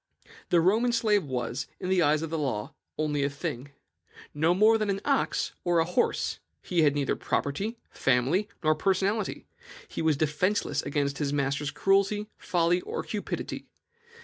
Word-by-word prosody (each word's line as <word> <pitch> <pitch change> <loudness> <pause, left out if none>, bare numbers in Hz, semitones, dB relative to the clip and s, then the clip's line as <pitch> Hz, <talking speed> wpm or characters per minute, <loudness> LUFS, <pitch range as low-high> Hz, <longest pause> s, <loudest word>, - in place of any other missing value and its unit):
"The 175 - +4
Roman 220 +8 +3
slave 215 -5 +2
was, 125 -3 -3
in - - -4
the 190 -1 +3
eyes 155 0 +3
of 160 - -5
the 165 - -1
law, 125 -8 -2 0.2
only 150 -2 0
a 140 - +1
thing, 145 -2 -5 0.6
no 160 +4 +2
more 220 +3 +5
than 215 -1 -1
an 195 0 0
ox 280 -2 0
or 175 -1 +2
a 165 - +4
horse. 180 +8 0 0.2
He 175 -2 +1
had 145 -2 +4
neither 140 -2 0
property, 200 +12 -2
family, 135 - +1
nor 155 0 +4
personality; 195 +5 0 0.4
he - - -5
was 160 -3 +2
defenceless 160 +7 0
against 140 -1 -1
his 145 -2 0
master's 140 0 0
cruelty, 200 +4 +1
folly, 175 0 +1
or - - -4
cupidity. 210 -2 -5
165 Hz, 160 wpm, -28 LUFS, 145-195 Hz, 0.6 s, more